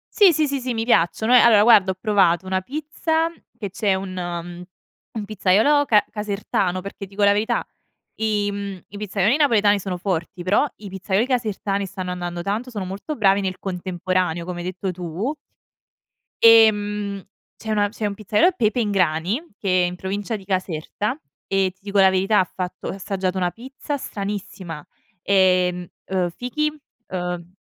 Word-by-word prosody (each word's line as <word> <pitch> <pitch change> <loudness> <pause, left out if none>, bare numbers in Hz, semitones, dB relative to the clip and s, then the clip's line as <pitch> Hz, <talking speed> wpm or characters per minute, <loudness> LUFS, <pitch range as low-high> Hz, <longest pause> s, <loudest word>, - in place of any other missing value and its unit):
Sì, 400 -5 +7
sì, 310 -1 +1
sì, 280 0 -1
sì, 250 -1 -3
mi 225 0 -1
piacciono 220 +2 +2
eh, - - +9
allora 220 -3 +6
guarda 210 -4 +6
ho - - -13
provato 190 -4 +2
una 190 0 0
pizza 315 - -1 0.3
che 200 -3 -5
c'è 200 +1 0
un 190 0 -4
mhmm, 175 -1 -5 0.5
un 220 -2 -4
pizzaiolo 215 +8 +3
ca 210 -6 +4
casertano 200 -3 -2
perché 195 +1 -8
dico 200 +2 -5
la 200 - +6
verità 220 +4 0 0.5
i 210 -2 0
mhmm, 200 -2 -6
i 205 - -9
pizzaioli 205 +4 +1
napoletani 215 -8 +4
sono 185 -1 -4
forti, 175 -1 -3
però 200 +10 +2
i 205 -1 -9
pizzaioli 190 +3 0
casertani 215 -5 -1
stanno 185 -1 -5
andando 175 -1 -4
tanto, 210 +7 -3
sono 210 -5 -4
molto 200 +11 -5
bravi 200 -4 +3
nel 185 -1 -3
contemporaneo, 185 -2 -2
come 180 0 -5
hai 175 - -5
detto 185 +1 -3
tu. 180 - -4 1.1
Ehm, 210 -3 +5 0.4
c'è 220 - -7
una 205 -1 +2
c'è 210 +1 -4
un 205 - -2
pizzaiolo, 215 - +2
Pepe 220 - +1
in 210 -3 0
grani, 180 - 0
che 185 -2 +2
è - - +2
in 175 0 -5
provincia 200 +4 -3
di 195 - -12
Caserta, 190 - -3 0.3
e 195 -1 +2
ti - - -39
dico 200 0 -2
la 190 -1 +7
verità 195 +3 +2
ha - - +3
fatto 180 0 -5
ho - - -2
assaggiato 190 -1 -3
una 180 -1 +1
pizza 265 +6 -6
stranissima. 195 - -6 0.4
Ehm, 180 -2 +2 0.2
uhm, 185 -2 0
fichi, 275 - -2 0.4
ehm, 180 -1 -4
200 Hz, 170 wpm, -22 LUFS, 185-220 Hz, 1.1 s, eh